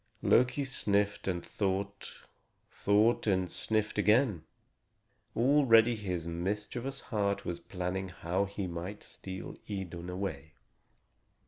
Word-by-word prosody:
Loki 125 +3 +4
sniffed 100 -7 0
and 90 -2 -1
thought, 100 0 -3 0.5
thought 105 +4 +3
and 95 -3 +1
sniffed 110 -1 0
again. 105 - +4 0.9
Already 120 -3 +5
his 90 -6 -3
mischievous 105 +10 -3
heart 100 -4 -1
was 85 -1 -3
planning 90 +2 -3
how 90 +2 -1
he 100 0 -4
might 90 +4 -5
steal 95 -1 -7 0.2
Idun 90 -3 -5
away. 80 -5 -4
100 Hz, 105 wpm, -31 LUFS, 90-110 Hz, 0.9 s, Already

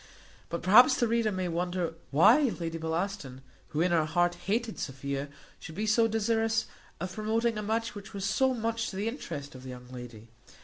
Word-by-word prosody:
But 170 - -4
perhaps 245 - +7
the 240 - +1
reader 230 -1 +1
may 185 -2 -2
wonder 175 0 -1 0.2
why 235 - +5
Lady 165 -1 -3
Bellaston, 160 -4 -3 0.3
who 155 - -2
in 175 +1 +2
her 165 -2 +3
heart 175 +2 +2
hated 210 +6 -2
Sophia, 140 +1 -4 0.3
should 160 - -9
be 210 +4 -1
so 225 +2 +4
desirous 225 0 +1 0.3
of 185 +2 -4
promoting 225 +2 0
a 210 - -3
match 225 +2 -1
which 205 0 -9
was 200 -2 -4
so 260 +6 +2
much 230 0 -1
to - - -8
the 200 +3 -2
interest 145 - -5
of 130 - -10
the 130 - -9
young 125 0 -10
lady. 120 -3 -9
190 Hz, 190 wpm, -29 LUFS, 160-225 Hz, 0.3 s, perhaps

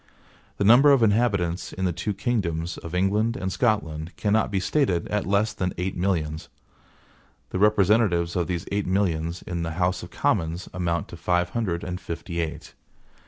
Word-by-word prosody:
The - - 0
number 125 +8 +7
of 135 -4 +5
inhabitants 100 -6 +1
in 95 - -2
the 90 - 0
two 90 +6 -3
kingdoms 90 -7 -2
of 85 +1 -7
England 105 +5 +1
and 95 0 -3
Scotland 85 -9 -1
cannot 110 +1 +1
be 100 -1 0
stated 95 - +1
at 105 -2 -1
less 100 +3 +2
than 90 -1 -2
eight 90 +1 -2
millions. 80 -4 -1 1.0
The 95 - -2
representatives 100 -4 +3
of 85 -2 0
these 85 -2 -3
eight 100 -1 -1
millions 85 -3 0
in 85 -1 -4
the 80 -1 -3
House 90 0 +1
of - - -9
Commons 85 +3 -1
amount 85 -2 -1
to 85 - -9
five 90 +1 +1
hundred 95 -7 -2
and 90 +1 -5
fifty 85 +1 -5
eight. 80 -2 -4
90 Hz, 170 wpm, -25 LUFS, 85-105 Hz, 1.0 s, number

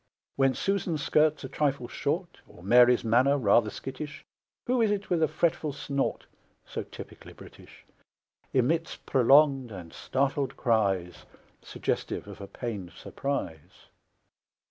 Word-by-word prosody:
When 135 -1 +2
Susan's 175 -6 -1
skirt's 155 -1 +2
a - - -4
trifle 140 -2 -1
short, 170 +8 -3
Or 85 - -16
Mary's 120 +4 +5
manner 125 +5 +3
rather 110 -2 +3
skittish, 135 +6 -8 0.4
Who 250 -1 +1
is 220 - +3
it, 205 -2 -2
with 170 -2 +2
a 160 - +4
fretful 155 -2 0
snort 140 -1 -2 0.4
(So - - -5
typically - - -11
British), - - -15 0.7
Emits 160 +6 +1
prolonged 135 -1 +4
and 90 -5 -9
startled 135 +1 -1
cries, 100 -7 0 0.4
Suggestive - - -3
of - - -10
a 100 - -7
pained 100 -6 -6
surprise? 85 - -5
135 Hz, 125 wpm, -28 LUFS, 115-155 Hz, 0.7 s, Mary's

